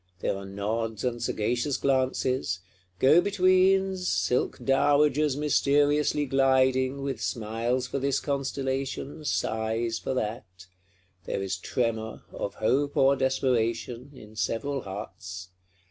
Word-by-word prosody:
There -, -, 0 dB
are 100 Hz, 0 st, -7 dB
nods 110 Hz, +2 st, -3 dB
and 120 Hz, -2 st, -2 dB
sagacious 120 Hz, +4 st, 0 dB
glances; 130 Hz, -6 st, 0 dB, 0.4 s
go 150 Hz, -, +6 dB
betweens, 190 Hz, -1 st, +3 dB
silk 125 Hz, -, 0 dB
dowagers 145 Hz, +1 st, +2 dB
mysteriously 145 Hz, 0 st, +2 dB
gliding, 130 Hz, 0 st, +2 dB
with 135 Hz, -4 st, -3 dB
smiles 115 Hz, +2 st, -1 dB
for 130 Hz, +2 st, -3 dB
this 140 Hz, 0 st, +1 dB
constellation, 140 Hz, +1 st, -3 dB
sighs 115 Hz, -2 st, -1 dB
for 130 Hz, -, -3 dB
that: 105 Hz, -6 st, -4 dB, 0.6 s
there 100 Hz, -, -2 dB
is 95 Hz, 0 st, -2 dB
tremor, 110 Hz, +2 st, -2 dB
of 100 Hz, -, -4 dB
hope 140 Hz, +6 st, 0 dB
or 135 Hz, +1 st, +5 dB
desperation, 125 Hz, -1 st, 0 dB
in 110 Hz, -3 st, -13 dB
several 135 Hz, +6 st, -2 dB
hearts. 95 Hz, -2 st, -8 dB
130 Hz, 115 wpm, -27 LUFS, 110-140 Hz, 0.6 s, go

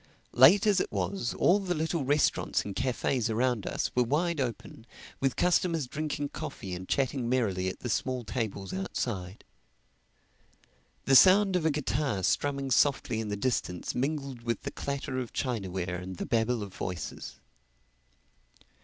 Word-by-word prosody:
Late 150 Hz, -, +7 dB
as 205 Hz, -3 st, +4 dB
it -, -, -2 dB
was, 100 Hz, +4 st, -2 dB
all 195 Hz, +4 st, +4 dB
the 185 Hz, -3 st, -2 dB
little 160 Hz, 0 st, -1 dB
restaurants 145 Hz, +3 st, +1 dB
and 100 Hz, -2 st, -5 dB
cafés 125 Hz, -1 st, 0 dB
around 120 Hz, -1 st, 0 dB
us -, -, -2 dB
were 125 Hz, -, +2 dB
wide 150 Hz, +5 st, +1 dB
open, 120 Hz, -1 st, -5 dB, 0.3 s
with 135 Hz, -1 st, 0 dB
customers 175 Hz, -4 st, +2 dB
drinking 145 Hz, +1 st, -3 dB
coffee 140 Hz, -13 st, -6 dB
and 90 Hz, +1 st, -7 dB
chatting 130 Hz, -3 st, 0 dB
merrily 100 Hz, -8 st, 0 dB
at -, -, -8 dB
the -, -, -4 dB
small 130 Hz, +1 st, -1 dB
tables 100 Hz, -4 st, -4 dB
outside. 95 Hz, 0 st, -4 dB, 1.6 s
The 135 Hz, -, +4 dB
sound 190 Hz, +5 st, +7 dB
of 165 Hz, -3 st, +2 dB
a -, -, +4 dB
guitar 140 Hz, -8 st, -1 dB
strumming 140 Hz, +5 st, 0 dB
softly 135 Hz, -4 st, +2 dB
in 110 Hz, -, -3 dB
the 105 Hz, 0 st, -3 dB
distance 90 Hz, -7 st, -2 dB
mingled 140 Hz, -1 st, -2 dB
with 115 Hz, -2 st, -2 dB
the -, -, -4 dB
clatter 140 Hz, -2 st, -3 dB
of 125 Hz, -3 st, -5 dB
chinaware 95 Hz, -8 st, -2 dB
and 95 Hz, +1 st, -7 dB
the -, -, -3 dB
babble 115 Hz, -2 st, 0 dB
of 100 Hz, -2 st, -9 dB
voices. 90 Hz, -1 st, -6 dB
125 Hz, 155 wpm, -29 LUFS, 105-145 Hz, 1.6 s, Late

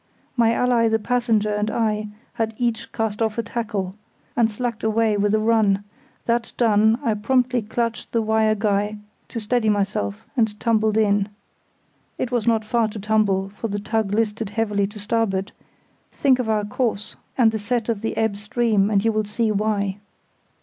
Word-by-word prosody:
My 230 Hz, -2 st, +4 dB
ally 240 Hz, -1 st, +3 dB
the 225 Hz, 0 st, +3 dB
Passenger 220 Hz, -2 st, +1 dB
and 210 Hz, +1 st, 0 dB
I 215 Hz, -2 st, 0 dB, 0.3 s
had 225 Hz, -1 st, -2 dB
each 235 Hz, -1 st, -1 dB
cast 225 Hz, -1 st, -2 dB
off 220 Hz, -1 st, 0 dB
a 230 Hz, -, 0 dB
tackle, 210 Hz, -5 st, -3 dB, 0.4 s
and 230 Hz, -2 st, +3 dB
slacked 235 Hz, +1 st, -4 dB
away 220 Hz, 0 st, +2 dB
with 205 Hz, 0 st, +1 dB
a -, -, +2 dB
run; 215 Hz, -3 st, +2 dB, 0.4 s
that 235 Hz, -1 st, 0 dB
done, 220 Hz, -1 st, +4 dB
I 225 Hz, -, +2 dB
promptly 250 Hz, +3 st, +1 dB
clutched 230 Hz, +2 st, -3 dB
the 230 Hz, -1 st, +1 dB
wire 220 Hz, 0 st, +2 dB
guy 205 Hz, 0 st, 0 dB, 0.3 s
to 235 Hz, -, -5 dB
steady 225 Hz, +1 st, +1 dB
myself, 195 Hz, -, -1 dB
and 220 Hz, -4 st, +1 dB
tumbled 220 Hz, -1 st, +2 dB
in. 205 Hz, -1 st, +2 dB, 0.9 s
(It 255 Hz, -, -2 dB
was 240 Hz, -2 st, 0 dB
not 225 Hz, -2 st, +2 dB
far 230 Hz, 0 st, +2 dB
to 215 Hz, 0 st, -7 dB
tumble, 200 Hz, -2 st, +1 dB
for 210 Hz, +3 st, -5 dB
the 205 Hz, -1 st, -3 dB
tug 215 Hz, 0 st, -1 dB
listed 220 Hz, 0 st, 0 dB
heavily 205 Hz, -2 st, 0 dB
to 210 Hz, +2 st, -11 dB
starboard; 205 Hz, -2 st, -1 dB, 0.6 s
think 265 Hz, -3 st, +3 dB
of 240 Hz, -3 st, -1 dB
our 210 Hz, -1 st, +1 dB
course, 210 Hz, -1 st, -2 dB, 0.2 s
and 235 Hz, -4 st, +5 dB
the 220 Hz, -, -3 dB
set 230 Hz, +2 st, -1 dB
of 225 Hz, -4 st, -1 dB
the 225 Hz, -, -3 dB
ebb 220 Hz, -2 st, +1 dB
stream, 210 Hz, -1 st, +1 dB
and 205 Hz, 0 st, +2 dB
you 225 Hz, -, +4 dB
will 215 Hz, -1 st, 0 dB
see 215 Hz, +2 st, 0 dB
why.) 205 Hz, -1 st, 0 dB
220 Hz, 175 wpm, -22 LUFS, 210-230 Hz, 0.9 s, and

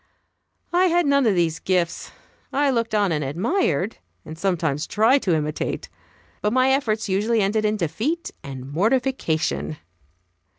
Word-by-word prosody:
I 360 Hz, +2 st, +4 dB
had 345 Hz, -1 st, +2 dB
none 280 Hz, -3 st, +3 dB
of 205 Hz, -, +3 dB
these 165 Hz, -2 st, +1 dB
gifts. 180 Hz, -3 st, -1 dB, 0.4 s
I 280 Hz, 0 st, +2 dB
looked 230 Hz, -3 st, -1 dB
on 205 Hz, -3 st, +2 dB
and 150 Hz, -2 st, 0 dB
admired, 185 Hz, -, 0 dB, 0.3 s
and 155 Hz, -, -8 dB
sometimes 165 Hz, -4 st, -1 dB
tried 225 Hz, +6 st, +3 dB
to 175 Hz, -4 st, +1 dB
imitate, 150 Hz, 0 st, -3 dB, 0.5 s
but 210 Hz, -, +1 dB
my 260 Hz, +1 st, +4 dB
efforts 225 Hz, -6 st, 0 dB
usually 210 Hz, +4 st, +1 dB
ended 210 Hz, +2 st, +1 dB
in 210 Hz, 0 st, +1 dB
defeat 220 Hz, -, -2 dB
and 135 Hz, -1 st, -8 dB
mortification. 160 Hz, -, 0 dB
205 Hz, 140 wpm, -23 LUFS, 160-255 Hz, 0.5 s, I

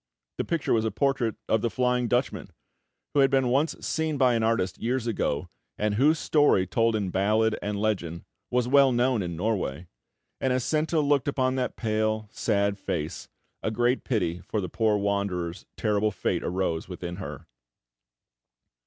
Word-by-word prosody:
The -, -, 0 dB
picture 165 Hz, -3 st, 0 dB
was 110 Hz, -2 st, +2 dB
a 110 Hz, -, +1 dB
portrait 125 Hz, 0 st, 0 dB
of 110 Hz, -, +2 dB
the 115 Hz, -, 0 dB
Flying 125 Hz, 0 st, +1 dB
Dutchman, 125 Hz, +2 st, -1 dB, 0.6 s
who 145 Hz, -, +2 dB
had 135 Hz, -1 st, +6 dB
been 135 Hz, -2 st, +2 dB
once 140 Hz, +6 st, +2 dB
seen 160 Hz, -2 st, -1 dB
by 130 Hz, -2 st, +4 dB
an 115 Hz, -, +1 dB
artist 110 Hz, -5 st, 0 dB
years 125 Hz, +1 st, -1 dB
ago, 95 Hz, -7 st, -1 dB, 0.3 s
and 105 Hz, 0 st, 0 dB
whose 145 Hz, +9 st, +4 dB
story 145 Hz, -12 st, +3 dB
told 115 Hz, +4 st, +1 dB
in 100 Hz, -4 st, -1 dB
ballad 110 Hz, +4 st, +2 dB
and 105 Hz, 0 st, -3 dB
legend 90 Hz, -6 st, -2 dB, 0.2 s
was 125 Hz, -1 st, +1 dB
well 135 Hz, 0 st, +5 dB
known 120 Hz, -1 st, +2 dB
in 85 Hz, -2 st, -4 dB
Norway; 90 Hz, -5 st, -2 dB, 0.5 s
and 130 Hz, -, 0 dB
as 125 Hz, -1 st, 0 dB
Senta 155 Hz, +3 st, +1 dB
looked 145 Hz, -2 st, +2 dB
upon 130 Hz, -2 st, +1 dB
that 125 Hz, -, -1 dB
pale, 110 Hz, -1 st, -1 dB
sad 100 Hz, 0 st, 0 dB
face, 80 Hz, 0 st, -4 dB, 0.3 s
a -, -, -1 dB
great 120 Hz, +3 st, +1 dB
pity 90 Hz, -8 st, -1 dB
for 105 Hz, +4 st, -3 dB
the 90 Hz, -3 st, -3 dB
poor 110 Hz, +2 st, +2 dB
wanderer's 100 Hz, -4 st, -2 dB
terrible 105 Hz, -1 st, +1 dB
fate 95 Hz, -, -2 dB
arose 90 Hz, -2 st, -2 dB
within 90 Hz, -1 st, -6 dB
her. 95 Hz, -, -7 dB
110 Hz, 170 wpm, -27 LUFS, 100-130 Hz, 0.6 s, had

